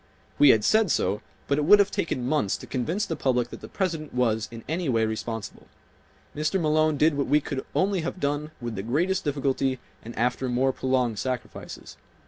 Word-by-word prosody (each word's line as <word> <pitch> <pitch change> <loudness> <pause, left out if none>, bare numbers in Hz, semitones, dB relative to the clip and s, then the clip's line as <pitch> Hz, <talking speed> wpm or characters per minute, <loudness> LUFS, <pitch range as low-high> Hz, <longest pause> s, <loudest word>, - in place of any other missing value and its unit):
We 145 - +8
had 110 -4 +5
said 220 -3 +4
so 105 - +1 0.3
but 140 +1 +1
it 150 - 0
would 205 +6 +8
have 205 -1 +3
taken 165 -10 -2
months 130 -7 +1
to - - -10
convince 160 - -1
the 165 - -3
public 125 -4 0
that - - -10
the - - -8
President 165 -8 -3
was 110 -3 +1
in 115 -1 -9
any 165 0 -1
way 115 -3 +2
responsible. 110 0 -5 0.7
Mr. 155 +5 0
Malone 155 -1 +2
did 155 +1 +3
what 140 -1 -1
we 150 - +4
could 140 -2 -4
only 190 -1 +2
have 175 +3 -4
done 145 +1 -1
with 120 -2 -4
the 95 - -4
greatest 165 - 0
difficulty 135 -2 0 0.2
and 115 +1 -10
after 125 +2 0
more 130 +2 +2
prolonged 125 -5 0
sacrifices. 125 -3 -5
140 Hz, 195 wpm, -26 LUFS, 120-155 Hz, 0.7 s, We